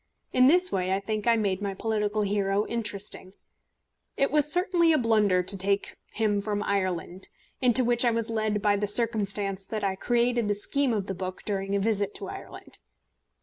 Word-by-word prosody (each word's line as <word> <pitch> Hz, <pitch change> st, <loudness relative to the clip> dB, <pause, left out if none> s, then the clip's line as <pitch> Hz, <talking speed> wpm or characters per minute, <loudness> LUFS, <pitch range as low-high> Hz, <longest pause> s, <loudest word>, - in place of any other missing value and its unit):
In 255 Hz, 0 st, +5 dB
this 360 Hz, +5 st, +4 dB
way 185 Hz, -1 st, -1 dB
I -, -, -1 dB
think 215 Hz, +2 st, -4 dB
I 235 Hz, -, +5 dB
made 200 Hz, -3 st, -1 dB
my 200 Hz, -1 st, -3 dB
political 215 Hz, 0 st, -1 dB
hero 200 Hz, 0 st, 0 dB
interesting. 205 Hz, -4 st, -5 dB, 0.8 s
It 275 Hz, -, +2 dB
was 300 Hz, 0 st, +2 dB
certainly 355 Hz, -1 st, +3 dB
a 310 Hz, -, +4 dB
blunder 210 Hz, -7 st, +2 dB
to 195 Hz, -, 0 dB
take 195 Hz, +1 st, -1 dB, 0.2 s
him 210 Hz, -2 st, 0 dB
from 205 Hz, 0 st, -2 dB
Ireland 185 Hz, -2 st, -3 dB, 0.3 s
into 250 Hz, 0 st, +5 dB
which 240 Hz, 0 st, +2 dB
I 240 Hz, -, +4 dB
was 230 Hz, -1 st, -1 dB
led 215 Hz, -2 st, -1 dB
by 205 Hz, -1 st, +3 dB
the 205 Hz, +1 st, -1 dB
circumstance 205 Hz, -3 st, +1 dB
that 215 Hz, +1 st, -5 dB
I 195 Hz, -1 st, 0 dB
created 240 Hz, +1 st, 0 dB
the 205 Hz, -, +1 dB
scheme 275 Hz, +6 st, +1 dB
of 210 Hz, -4 st, -1 dB
the 195 Hz, -, -4 dB
book 185 Hz, 0 st, -6 dB
during 195 Hz, -1 st, -2 dB
a -, -, +1 dB
visit 205 Hz, -1 st, -1 dB
to 195 Hz, -, -6 dB
Ireland. -, -, -11 dB
210 Hz, 190 wpm, -27 LUFS, 195-235 Hz, 0.8 s, In